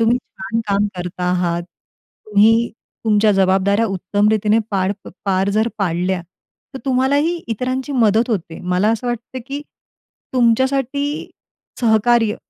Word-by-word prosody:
तुम्ही 230 +2 +4
छान 230 0 -5
काम 200 +1 +2
करता 180 0 -4
आहात. 175 -1 0 0.6
तुम्ही 220 +3 +4 0.3
तुमच्या 210 -1 +4
जबाबदाऱ्या 195 +3 +3
उत्तमरीतीने 210 +3 +1
पार 195 -1 +1 0.3
पार 190 0 +1
जर 220 +3 +1
पाडल्या, 180 -1 0 0.5
तर - - -4
तुम्हालाही 280 +6 +2
इतरांची 255 +5 -2
मदत 230 -1 +3
होते. 170 -6 -3
मला 180 +3 +1
असं 230 +2 -3
वाटतं, 240 +2 -4
की 285 +1 -5 0.7
तुमच्यासाठी 265 +4 +1 0.5
सहकार्य 225 -1 +3
220 Hz, 115 wpm, -19 LUFS, 195-245 Hz, 0.7 s, तुम्ही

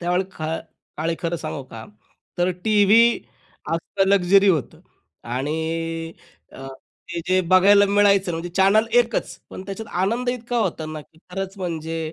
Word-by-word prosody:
त्यावेळी 180 +2 +1
त्या 190 - -20
खा 160 +1 -3 0.4
काळी 165 +1 -1
खरं 170 0 -2
सांगू 155 -3 -5
का, 115 -1 -9 0.5
तर 175 +1 +2
टीव्ही 215 +1 +5 0.7
असं 195 +4 -1
लक्झरी 195 +1 +4
होतं 155 -9 0 0.5
आणि 140 +5 -2 1.0
अ, 135 - -9
ते 170 +5 -10
जे 185 0 +3
बघायला 200 +2 +6
मिळायचं 200 -2 +3
म्हणजे 165 +2 -4
चॅनल 195 +5 +3
1 235 -2 -2
च. - - -4
पण 185 - -8
त्याच्यात 210 +2 -7
आनंद 235 +6 -1
इतका 245 -1 -3
होता 160 -8 -2
ना, 155 0 -6
की 160 +2 -21
खरंच 195 +1 -5
म्हणजे 165 -3 -4
185 Hz, 155 wpm, -22 LUFS, 165-200 Hz, 1.0 s, बघायला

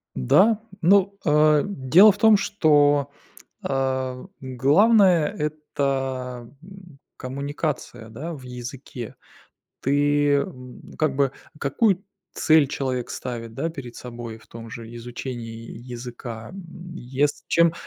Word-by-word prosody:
Да. 200 - +4 0.2
Ну, 200 +2 +4
э, 150 -1 +4
дело 190 +4 +6
в 200 - -8
том, 220 0 +6
что, 145 -8 +3 0.5
э, 130 -1 -2 0.2
главное- 165 - +4 0.3
это, 130 -4 -3
м, 180 -5 -14 0.2
коммуникация, 140 -2 -4
да, 145 +10 -6
в 140 -4 -10
языке. 125 -1 -8 0.7
Ты, 145 +1 +2
м, 125 -2 -11 0.2
как 155 -4 +1
бы 135 -1 +2 0.3
Какую 190 - +1 0.3
цель 155 -2 +4
человек 130 -3 -3
ставит, 115 -2 -6
да, 145 +8 -2
перед 125 -7 -9
собой 120 -2 -8
в 110 - -21
том 115 0 -10
же 115 0 -9
изучении 115 -1 -7 0.2
языка. 120 -1 -8
М, 175 -2 -10
ес 140 0 -1
чем, 170 -1 +4
140 Hz, 115 wpm, -24 LUFS, 125-165 Hz, 0.7 s, дело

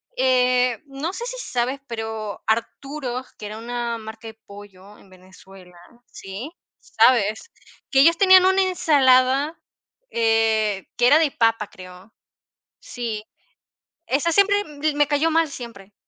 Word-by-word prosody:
Eh, 250 -2 +2
no 275 +5 -5
sé 425 +5 -6
si - - -6
sabes, 255 +3 -2
pero 220 -2 -6
Arturo's, 255 +3 -3
que 210 - -9
era 210 +1 -8
una 235 0 -4
marca 220 0 -10
de 220 - -10
pollo 200 -1 -15
en 195 - -21
Venezuela, 185 0 -17 0.3
¿sí? 195 +10 -9 0.3
¿Sabes? 220 - +1 0.4
Que 270 - +3
ellos 335 +3 +5
tenían 375 -1 +6
una 380 +1 +3
ensalada, 285 -4 +2 0.5
eh, 220 -3 +1
que 245 - +4
era 295 +5 +6
de 310 -3 +1
papa, 225 -3 +1
creo. 185 +3 -14 0.7
Sí. 230 -3 -5 0.8
Esa 295 +5 0
siempre, 405 +2 +3
mm, 300 -1 -3
me 295 -1 +3
cayó 295 +3 +1
mal 325 0 +2
siempre. 230 -7 -10
245 Hz, 135 wpm, -22 LUFS, 215-290 Hz, 0.8 s, tenían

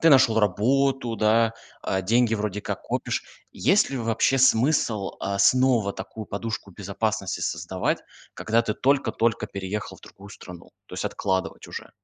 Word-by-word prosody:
ты 165 - +5
нашёл 130 -5 +5
работу, 120 +4 +1
да, 115 +1 +3 0.3
а, 95 0 -1
деньги 115 +3 +2
вроде 105 -1 -2
как - - -5
копишь. - - -2 0.3
Есть - - +3
ли 135 - -3
вообще 115 +3 +1
смысл, 120 -5 +2
а, 100 0 -2
снова 115 0 +4
такую 110 -1 -8
подушку 105 -1 -5
безопасности 100 -1 -3
создавать, 85 +2 -1 0.4
когда 115 +2 +1
ты 110 -2 -2
только-только 120 -5 +1
переехал 100 +1 -5
в - - -21
другую 100 +1 -14
страну, 90 -3 -12 0.2
то - - -19
есть - - -4
откладывать 95 -1 -2
уже? - - -8
110 Hz, 150 wpm, -25 LUFS, 100-120 Hz, 0.4 s, ты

